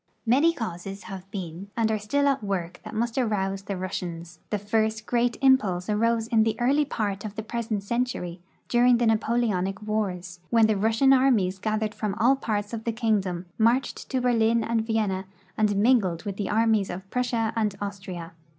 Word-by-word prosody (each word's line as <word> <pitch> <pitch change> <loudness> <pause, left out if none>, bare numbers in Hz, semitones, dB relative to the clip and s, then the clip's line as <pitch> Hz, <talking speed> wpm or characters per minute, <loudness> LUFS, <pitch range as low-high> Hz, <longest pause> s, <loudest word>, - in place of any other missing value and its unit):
Many 275 +8 +4
causes 195 - -6
have 195 0 -9
been 190 -1 -6
and 225 -1 +2
are 215 - 0
still 285 +8 +1
at 275 -4 +1
work 180 -3 -3
that - - -8
must 235 +3 -1
arouse 195 -5 0
the 195 -1 -5
Russians. 175 -2 -5
Tlie 210 - -1
first 215 +1 0
great 240 0 +1
impulse 210 -9 +3
arose 230 +1 +1
in 225 -1 +3
the 220 0 0
early 280 +5 +3
part 205 -7 -3
of 210 -1 -6
the 220 - -4
iH'esent 225 -2 -3
century, 235 -6 -2 0.3
during 245 0 +4
the 240 - +1
Napoleonic 220 -4 +1
wars, 185 -5 -3
when 230 -2 +5
the 215 -1 +2
Rus 220 +3 +1
sian 270 +1 +6
armies 225 -9 +3
gathered 215 +1 -1
from 210 -3 -3
all 240 +5 +4
parts 210 -4 -3
of 225 -1 -4
the 230 - -1
kingdom, 205 -6 0
marched 235 +4 +1
to 260 -2 0
Berlin 230 -2 +2
and 230 0 0
Vienna, 205 -4 0 0.3
and 210 -2 +2
mingled 200 -6 +2
with 200 -2 -4
the 205 - -2
armies 220 -2 +2
of 185 +2 -6
Prussia 235 -3 0
and 215 -3 0
Austria. 190 -4 -6
215 Hz, 185 wpm, -26 LUFS, 195-235 Hz, 0.3 s, sian